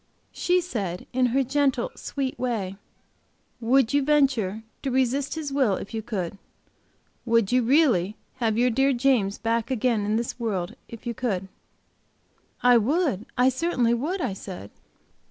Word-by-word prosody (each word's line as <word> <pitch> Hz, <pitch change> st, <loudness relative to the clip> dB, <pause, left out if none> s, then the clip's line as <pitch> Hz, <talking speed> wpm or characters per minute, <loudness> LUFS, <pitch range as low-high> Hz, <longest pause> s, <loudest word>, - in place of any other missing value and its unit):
She 360 Hz, 0 st, +1 dB
said, 200 Hz, -, -4 dB
in 255 Hz, 0 st, +3 dB
her 265 Hz, +3 st, +2 dB
gentle, 285 Hz, -, +1 dB
sweet 270 Hz, -2 st, -4 dB
way: 220 Hz, -7 st, -2 dB, 0.8 s
'Would 250 Hz, +2 st, +3 dB
you 285 Hz, -, +4 dB
venture 265 Hz, -8 st, +2 dB, 0.2 s
to 275 Hz, -, -2 dB
resist 265 Hz, +3 st, 0 dB
His 300 Hz, -3 st, -4 dB
will, 260 Hz, -8 st, +3 dB
if 200 Hz, -, -7 dB
you 225 Hz, -, -2 dB
could? 200 Hz, -5 st, -4 dB, 0.8 s
Would 230 Hz, -4 st, +2 dB
you 250 Hz, 0 st, +4 dB
really 235 Hz, -, +3 dB, 0.2 s
have 225 Hz, -4 st, 0 dB
your 245 Hz, +1 st, +3 dB
dear 270 Hz, +3 st, +3 dB
James 240 Hz, -6 st, +2 dB
back 230 Hz, +1 st, -1 dB
again 240 Hz, -4 st, +1 dB
in 210 Hz, +1 st, 0 dB
this 235 Hz, +2 st, -2 dB
world, 195 Hz, -7 st, -2 dB
if 230 Hz, +1 st, -10 dB
you 240 Hz, -, -2 dB
could?" 195 Hz, -6 st, -2 dB, 1.1 s
'I 245 Hz, -1 st, +7 dB
would, 265 Hz, -, 0 dB
I 250 Hz, +1 st, +5 dB
certainly 255 Hz, -4 st, +1 dB
would,' 320 Hz, +11 st, -1 dB
I 195 Hz, -, -1 dB
said. 185 Hz, -, -8 dB
240 Hz, 155 wpm, -25 LUFS, 215-270 Hz, 1.1 s, I